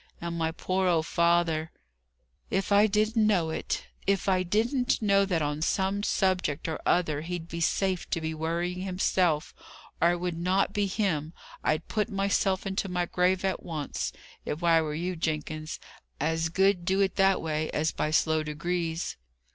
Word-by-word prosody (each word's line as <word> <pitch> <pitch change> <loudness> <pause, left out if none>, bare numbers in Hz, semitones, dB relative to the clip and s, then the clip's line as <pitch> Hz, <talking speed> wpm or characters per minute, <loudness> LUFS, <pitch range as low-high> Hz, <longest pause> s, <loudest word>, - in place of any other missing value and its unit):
And 170 0 -4
my 165 -1 0
poor 185 +3 -1
old 165 -3 +2
father 170 -2 +2 0.4
" 60 +3 -43
"If 195 - -5
I 205 +1 +6
didn't 215 +2 +2
know 175 -7 +2
it! - - -3 0.2
If 200 0 +1
I 185 -1 +3
didn't 240 +8 +1
know 200 -2 +3
that, 175 -5 0
on 145 +1 -2
some 190 +4 0
subject 185 -7 0
or 160 - -3
other, 155 -4 +2
he'd 170 0 -5
be 170 0 -5
safe 185 +1 0
to - - 0
be 160 0 -3
worrying 170 +3 -2
himself, 180 -4 0 0.5
or 170 - +6
it 175 - -3
would 175 -2 -3
not 190 +3 +1
be 205 -1 +1
him! 175 -6 -1 0.3
I'd 155 +2 0
put 215 +1 -1
myself 195 -1 +1
into 195 0 -2
my 180 -1 0
grave 180 +2 +1
at 190 - -1
once, 155 -4 -4 0.3
if 155 +4 -4
I 165 -1 +5
were 150 -1 -3
you, 180 +3 -2
Jenkins. 155 -1 -3 0.4
As 160 +2 0
good 190 +1 +2
do 190 +3 +1
it 195 -1 +1
that 195 -1 +4
way, 155 -1 -2
as 155 +1 0
by 155 - -1
slow 160 0 +2
degrees." 165 +2 -3
175 Hz, 175 wpm, -28 LUFS, 160-195 Hz, 0.5 s, I